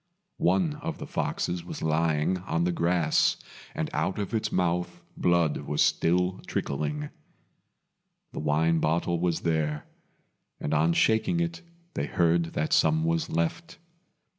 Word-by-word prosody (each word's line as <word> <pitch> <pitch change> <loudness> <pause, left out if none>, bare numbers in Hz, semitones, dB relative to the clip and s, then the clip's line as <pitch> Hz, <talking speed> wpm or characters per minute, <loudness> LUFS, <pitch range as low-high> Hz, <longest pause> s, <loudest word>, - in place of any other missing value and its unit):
One 160 -6 +2
of 160 +2 -5
the - - -7
foxes 90 -1 -2
was - - -7
lying 80 +2 +1
on 85 -2 -1
the 90 - +1
grass, 85 -1 +2 0.4
and - - -1
out 95 - -1
of 105 +1 -3
its 110 -1 -1
mouth 90 -1 -1
blood 85 -3 +2
was 75 - 0
still 90 +2 +1
trickling. 75 +1 -2 1.2
The - - -6
wine 80 +2 +2
bottle 85 +2 0
was 85 -2 0
there; 75 -2 -1 0.7
and 75 - -2
on 80 +2 +3
shaking 110 - +2
it 170 0 -2 0.3
they 70 - -2
heard 85 0 +1
that 75 - -1
some 80 0 +3
was 80 0 0
left. 85 - -2
85 Hz, 140 wpm, -27 LUFS, 80-90 Hz, 1.2 s, on